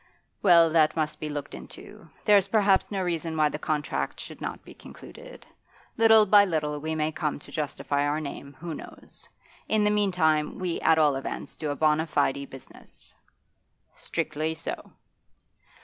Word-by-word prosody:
'Well, 170 -4 +6
that 155 -1 +3
must 155 -2 -2
be 155 - -4
looked 145 -1 -5
into. - - -11 0.2
There's 205 -3 +5
perhaps 200 -2 +3
no 195 -2 -2
reason 165 -2 -2
why 155 -1 +3
the 150 - -5
contract 150 -1 -2
should - - -9
not - - -6
be - - -12
concluded. - - -13 0.5
Little 220 -1 +6
by 205 0 +7
little 150 -5 -1
we 160 +1 -3
may 155 0 0
come 150 -1 -2
to - - -15
justify 145 -1 -2
our 150 +1 0
name; 140 -1 -7
who 165 +4 -6
knows? - - -9 0.4
In 215 -1 +2
the 210 - +3
meantime, 175 -7 +1
we 180 -2 -3
at 160 - +4
all 150 -3 +4
events 135 - -5
do 155 - -4
a 145 - -2
bona 155 +2 +2
fide 140 -2 0
business.' 135 - -14 0.8
'Strictly 155 -1 -3
so. 160 - -6
160 Hz, 165 wpm, -26 LUFS, 150-185 Hz, 0.8 s, by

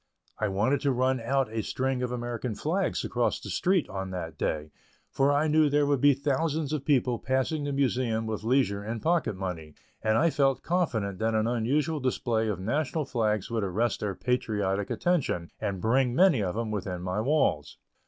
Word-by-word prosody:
I 110 - +1
wanted 105 +8 +1
to 140 - +2
run 130 +1 +1
out 125 0 0
a 115 - -1
string 130 +3 -2
of 125 -1 -2
American 120 -1 -3
flags 175 - -1
across 120 -1 0
the - - -7
street 185 -3 +1
on 95 0 -5
that 90 -3 -5
day, 75 0 -2 0.4
for 140 +1 +2
I 145 +2 +2
knew 155 0 +4
there 145 0 +3
would 140 -3 +1
be 145 -1 +6
thousands 145 +2 -1
of 150 -3 -2
people 125 -4 +2
passing 130 +3 -1
the 145 - -2
Museum 125 -5 0
with 110 -2 -3
leisure 115 -4 +1
and 110 +2 -4
pocket 165 - +1
money, 90 -5 -5 0.3
and 110 0 +2
I 165 +2 +3
felt 135 -2 +1
confident 115 - -1
that 110 0 0
an 110 0 +2
unusual 135 +7 0
display 120 -4 0
of 105 -4 -2
national 140 +8 -1
flags 110 -5 -1
would 115 -2 0
arrest 105 +5 0
their 100 -2 -3
patriotic 105 -6 -1
attention, 150 - 0
and 100 -2 -2
bring 125 +4 +2
many 170 - +5
of 90 -1 -2
them 115 -1 -2
within 90 -4 -4
my 90 +3 -1
walls. 120 - +1
120 Hz, 190 wpm, -28 LUFS, 105-140 Hz, 0.4 s, be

